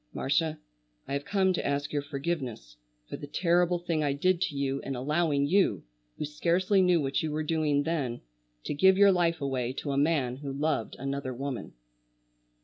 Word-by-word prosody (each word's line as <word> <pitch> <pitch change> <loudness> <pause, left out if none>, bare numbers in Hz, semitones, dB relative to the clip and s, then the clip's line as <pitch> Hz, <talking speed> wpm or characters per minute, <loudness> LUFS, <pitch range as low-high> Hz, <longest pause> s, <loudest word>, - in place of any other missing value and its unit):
"Marcia, 155 +3 0 0.5
I - - -4
have 140 +1 -2
come 190 -2 +2
to - - -2
ask 140 +1 -2
your 145 - +1
forgiveness 140 - -4 0.3
for - - -6
the 145 - -8
terrible 175 +3 +2
thing 170 -3 -1
I 145 -1 +1
did 180 +5 +1
to 180 -5 -1
you 140 0 -1
in 135 - -5
allowing 145 +2 +1
you, 145 - +2 0.3
who - - -2
scarcely 175 +6 +2
knew 180 -2 +4
what 135 -2 0
you 160 - -2
were 155 +1 -1
doing 150 -2 +1
then, 145 -7 -2 0.4
to - - -3
give 190 +6 +5
your 200 0 +7
life 170 -3 +1
away 130 -3 -1
to 140 +1 -4
a 135 - -1
man 140 -5 +1
who 140 0 -6
loved 140 -4 -1
another 135 -1 -4
woman." 135 0 -5
150 Hz, 185 wpm, -29 LUFS, 140-170 Hz, 0.5 s, your